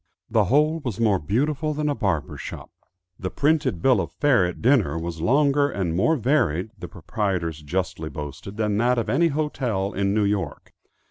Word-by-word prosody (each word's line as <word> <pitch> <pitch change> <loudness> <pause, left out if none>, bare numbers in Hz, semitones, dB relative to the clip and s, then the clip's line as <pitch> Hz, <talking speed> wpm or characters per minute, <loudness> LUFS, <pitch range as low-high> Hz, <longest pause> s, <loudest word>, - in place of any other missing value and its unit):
The 110 -2 +3
whole 150 - +2
was 120 -8 -5
more 105 -5 +3
beautiful 145 - -1
than 150 0 -1
a 145 - +1
barber's 95 - -2
shop. - - -8 0.5
The 95 - -3
printed 140 - +1
bill 125 -7 +4
of 85 - -5
fare 125 -11 +3
at 90 - -6
dinner 110 - +3
was 85 -1 -5
longer 140 - +3
and 90 -9 -2
more 160 - +3
varied, 115 - +1
the - - -8
proprietors 90 -5 -3
justly 90 +1 -3
boasted, 75 +6 -8
than 105 -2 0
that 125 +2 +2
of 115 - -1
any 170 +6 +3
hotel 130 -10 -1
in 100 0 0
New 105 0 +2
York. 100 -6 -3
105 Hz, 180 wpm, -24 LUFS, 90-140 Hz, 0.5 s, bill